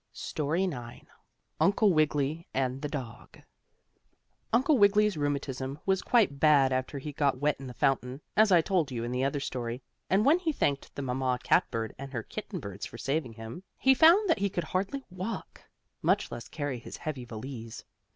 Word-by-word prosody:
STORY 155 +5 -1
IX 125 -10 -5 0.5
UNCLE 200 0 +4
WIGGILY 155 +1 +1
AND 130 0 -1
THE 150 - -2
DOG 125 -5 -7 1.1
Uncle 260 +4 +3
Wiggily's 205 0 +4
rheumatism 140 -2 -2
was 190 -1 +2
quite 205 - +2
bad 140 -4 +5
after 130 +2 -2
he 145 +2 -6
got 140 -2 +1
wet 145 +2 +1
in 135 - -8
the 125 - -9
fountain, 130 -1 0 0.2
as 215 -1 +5
I 175 -2 +7
told 170 -3 +1
you 120 -3 -4
in 120 - -3
the 125 +1 0
other 140 +1 0
story, 125 -2 -4 0.3
and 195 +3 +3
when 310 +6 +5
he 335 -3 0
thanked 140 - -1
the 140 - -4
mamma 130 0 0
cat - - +3
bird 110 -1 -3
and 135 0 -7
her 115 -3 -3
kitten - - -6
birds 100 0 -6
for - - -11
saving 135 -1 -2
him, 110 +8 -8 0.2
he 265 - +5
found 335 +10 +6
that 330 - +2
he 200 0 +1
could 175 -2 -2
hardly 195 - -2
walk, 185 +3 -6 0.4
much - - +1
less 120 0 -7
carry 145 -5 -4
his - - -9
heavy 150 -6 -5
valise. 115 0 -8
140 Hz, 185 wpm, -29 LUFS, 125-190 Hz, 1.1 s, I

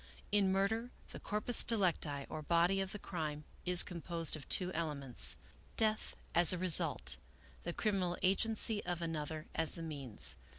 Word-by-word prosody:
In 200 -2 +2
murder, 220 +5 -1 0.2
the - - -9
corpus 210 +3 +3
delicti, 165 -10 0
or 155 - -7
body 170 +5 +1
of 190 0 -5
the - - -6
crime, 155 -6 -6 0.2
is 180 -1 +9
composed 170 -2 -2
of 155 - -11
two 185 -1 +2
elements: 145 -6 -1 0.2
'* - - -28
Death, 215 -1 0 0.2
as 175 -1 +6
a 180 - -2
result. 180 -3 +3 0.2
" - - -25
The 175 - -3
criminal 185 -4 -1
agency 215 +3 +2
of 175 -1 -4
another 155 -1 -5
as 160 -1 0
the 165 - -7
means. 140 -8 -5
175 Hz, 165 wpm, -34 LUFS, 155-195 Hz, 0.2 s, is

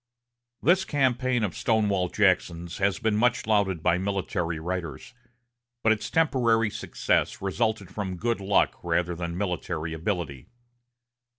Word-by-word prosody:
This 180 +6 +4
campaign 130 -5 +1
of 100 - -2
Stonewall 100 -5 +1
Jackson's 90 -3 +1
has 95 0 +2
been 110 -2 0
much 120 +3 +2
lauded 100 -6 +1
by 85 - +3
military 95 -3 -2
writers; 85 - -5 0.7
but 110 - +5
its 110 -1 -1
temporary 120 -9 +2
success - - -1
resulted 105 0 -1
from 95 -3 -4
good 115 +4 -1
luck 100 0 +1
rather 85 0 0
than 85 0 -4
military 90 -4 -3
ability. 80 - -3
100 Hz, 125 wpm, -26 LUFS, 85-110 Hz, 0.7 s, but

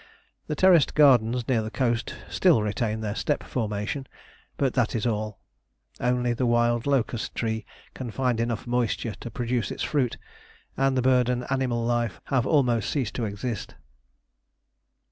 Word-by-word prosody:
The 150 - -2
terraced 175 -2 +5
gardens 125 -5 +4
near 120 -4 +2
the 110 - -4
coast 120 -1 -1
still 110 - +3
retain 110 +1 -1
their 105 -2 -2
step 145 +6 -1
formation, 110 +3 -3 0.5
but 135 -3 +1
that 120 -4 +1
is 110 - -1
all. 110 -3 -2 0.6
Only 125 0 +1
the 125 +1 0
wild 120 +1 +2
locust 125 -4 0
tree 110 -1 -2 0.3
can 130 -2 -6
find 125 +1 0
enough 115 -1 -2
moisture 120 -2 -1
to 120 - -7
produce 120 -1 -2
its - - -4
fruit, 135 -6 0 0.6
and 135 -1 +2
bird 125 -1 +3
and 125 0 -1
animal 125 -3 0
life 120 -7 0
have 130 -1 +2
almost 125 -8 +2
ceased 130 -8 -1
to 120 - -2
exist. 105 +3 -4
120 Hz, 150 wpm, -26 LUFS, 110-130 Hz, 0.6 s, terraced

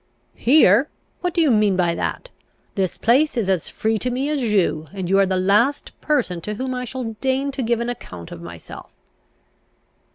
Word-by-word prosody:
"Here? 245 - +4 0.3
What 360 - -1
do 345 -1 +1
you 305 -5 +4
mean 210 -3 +3
by 175 -2 +1
that? - - -4 0.4
This 190 -3 -2
place 265 +5 +2
is 200 -5 +1
as 180 -4 -1
free 220 0 -1
to 250 - -2
me 260 +4 -2
as 295 -3 -1
you, 190 -9 +1
and 190 -3 -4
you 195 +2 +3
are 195 - +4
the 190 0 0
last 210 +10 +2
person 240 - 0
to 210 +5 -4
whom 255 +3 -3
I 250 0 -3
shall 245 -2 -5
deign 270 +1 0
to 270 0 -4
give 235 -1 0
an 235 0 -2
account 90 - -9
of 85 - -9
myself." 85 -1 -10
225 Hz, 195 wpm, -21 LUFS, 190-265 Hz, 0.4 s, Here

